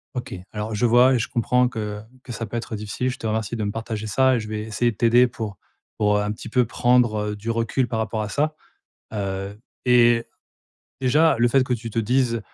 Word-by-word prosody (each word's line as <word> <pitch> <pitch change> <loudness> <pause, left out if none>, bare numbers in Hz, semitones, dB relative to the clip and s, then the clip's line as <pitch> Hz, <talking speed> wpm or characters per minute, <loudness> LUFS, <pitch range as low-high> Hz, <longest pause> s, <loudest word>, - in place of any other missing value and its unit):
OK. 125 - -5 0.2
Alors 105 +1 -4
je 115 +4 +1
vois 125 +3 +5
et 125 - +2
je 110 - -1
comprends 125 +1 +2
que 105 -3 -5 0.2
que 125 - -9
ça 115 0 -4
peut 120 - -4
être 115 -1 -5
difficile. 105 +5 -3
Je 125 - -5
te 115 - -3
remercie 110 0 -2
de 110 - -3
me 100 - -1
partager 110 -1 -5
ça 130 +4 +3
et 120 - 0
je 110 - -6
vais 105 0 -4
essayer 110 +2 0
de 110 - -12
t'aider 120 +2 +5
pour 110 -4 -6 0.4
pour, 105 -1 +2
heu, - - +1
un 105 0 -1
petit 105 - -8
peu 125 +1 +2
prendre, 120 -2 +2
heu, - - -4
du 105 +3 -6
recul 115 +2 0
par 110 - -2
rapport 110 0 -2
à 105 - -5
ça. 155 +4 0 0.6
Heu, 100 0 -4 0.3
et 120 -1 +5 0.8
déjà, 150 +5 +4
le 120 +1 +4
fait 135 +2 +4
que 125 - -2
tu 115 -1 -6
te 115 - -3
dises: 115 0 +1
115 Hz, 235 wpm, -23 LUFS, 105-125 Hz, 0.8 s, vois